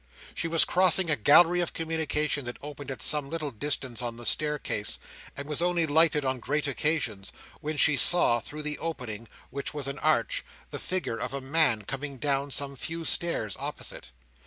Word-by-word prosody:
She - - -2
was 165 -1 +5
crossing 185 -1 +4
a - - +3
gallery 170 +8 +5
of 175 - -2
communication 155 -3 -1
that 120 - -4
opened 145 -1 -8
at 135 - -5
some 150 -2 +2
little 155 -3 -3
distance 130 0 -3
on 120 -1 -4
the 120 - -7
staircase, 150 -9 0 0.4
and 140 0 -5
was 150 +1 -2
only 175 -1 +2
lighted 155 -1 +3
on 130 -1 -1
great 150 +5 -1
occasions, 135 -8 -1 0.3
when 155 0 -4
she 150 +1 +7
saw, 155 -9 +3
through 150 +6 -8
the 150 0 -3
opening, 120 -9 -5 0.2
which 140 +2 -2
was 145 -2 -2
an 140 +1 -4
arch, - - +1 0.3
the - - -5
figure 180 -11 -1
of - - -3
a - - -2
man 135 -5 +2
coming 135 +4 -5
down 140 +1 0
some 140 0 -2
few 165 +5 -5
stairs 135 - 0
opposite. - - -4
150 Hz, 180 wpm, -28 LUFS, 135-160 Hz, 0.4 s, she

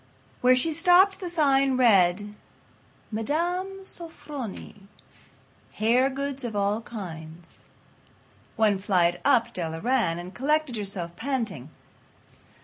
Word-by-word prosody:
Where 255 0 +5
she 315 +6 +1
stopped 360 +4 +4
the 365 -3 -5
sign 275 -5 +2
read: 205 -4 +3 0.8
"Mme. 350 - -2
Sofronie. 285 - -7 0.9
Hair 240 +5 +2
Goods 275 0 -4
of 230 -3 -4
All 205 +2 0
Kinds." 170 -7 -9 1.0
One 210 -3 +2
flight 175 -3 +1
up 230 -1 +3
Della 165 -2 -4
ran, 230 -7 +1
and 175 +2 -8
collected 295 +3 0
herself, 190 -5 -4
panting. 225 - -3
230 Hz, 105 wpm, -26 LUFS, 190-285 Hz, 1.0 s, Where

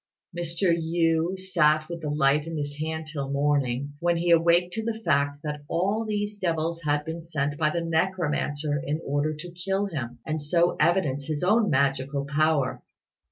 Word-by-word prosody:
Mr. 170 +1 0
Yü 165 +2 +1
sat 155 -5 +2
with 170 -1 -6
the 150 - -3
light 145 +1 +2
in 165 -1 -4
his 145 0 -4
hand 160 0 -3
till 145 -3 -5
morning, 140 -1 0
when 170 0 +1
he 170 +1 +1
awaked 170 +2 +4
to 225 - -2
the 225 0 -3
fact 140 0 +2
that 150 -1 -4
all 200 +6 +1
these 205 -1 -3
devils 165 -2 -1
had 150 -1 0
been 160 +1 -5
sent 150 -3 -2
by 155 0 +2
the 170 +2 -1
necromancer 155 -4 0
in 150 +2 -2
order 145 +2 0
to 175 +3 -8
kill 190 +3 -1
him, 130 -10 -5
and 155 -1 -2
so 170 +4 +2
evidence 145 -6 +2
his 155 0 -2
own 210 +3 +3
magical 140 0 +1
power. 140 -3 +1
160 Hz, 175 wpm, -26 LUFS, 145-175 Hz, -, awaked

